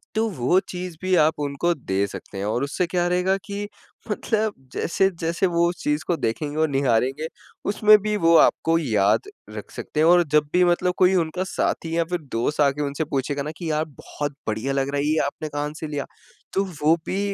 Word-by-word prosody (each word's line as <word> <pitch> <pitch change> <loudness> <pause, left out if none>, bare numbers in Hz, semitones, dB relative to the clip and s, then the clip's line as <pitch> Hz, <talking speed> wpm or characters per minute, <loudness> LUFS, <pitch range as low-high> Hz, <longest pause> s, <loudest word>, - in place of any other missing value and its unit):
तो 220 +1 +2
वो 175 - +2
चीज़ 180 -1 -5
भी 185 0 0
आप 155 -2 +3
उनको 145 +4 0
दे 100 - -1
सकते 100 - -9
हैं 100 - -3
और 115 +5 0
उससे 145 +6 -1
क्या 175 0 0
रहेगा 180 +2 +2
कि 200 +2 -4 0.4
मतलब 220 -1 0 0.2
जैसे-जैसे 170 0 0
वो 170 -1 +2
उस 175 - -4
चीज़ 150 +1 0
को 175 - +2
देखेंगे 145 +6 -2
और 160 - +3
निहारेंगे 135 +2 +1 0.4
उसमें 210 +1 +6
भी 210 +1 -1
वो 165 0 +6
आपको 165 +1 +4
याद 110 - +1 0.3
रख - - -8
सकते 150 - -5
हैं 160 - +5
और 175 +1 +6
जब 150 -1 +3
भी 180 - +5
मतलब 180 +1 +2
कोई 185 +1 +4
उनका 165 +3 -3
साथी 165 0 -1
या 170 - +3
फिर 180 - 0
दोस्त 120 +7 0
आके 145 0 +2
उनसे 145 +2 -2
पूछेगा 140 +1 -1
ना 150 - -4
कि 165 -3 -3
यार 155 +1 0
बहुत 145 -1 -6
बढ़िया 110 +5 -1
लग 135 0 0
रहा 145 - -1
है, 140 - 0
ये 155 +1 +2
आपने 150 +2 -5
कहाँ 145 0 -3
से 160 - -4
लिया। 145 -2 -3 0.5
तो 195 - +2 0.2
वो 155 +2 +5
भी 190 - -2
155 Hz, 210 wpm, -23 LUFS, 140-180 Hz, 0.5 s, उसमें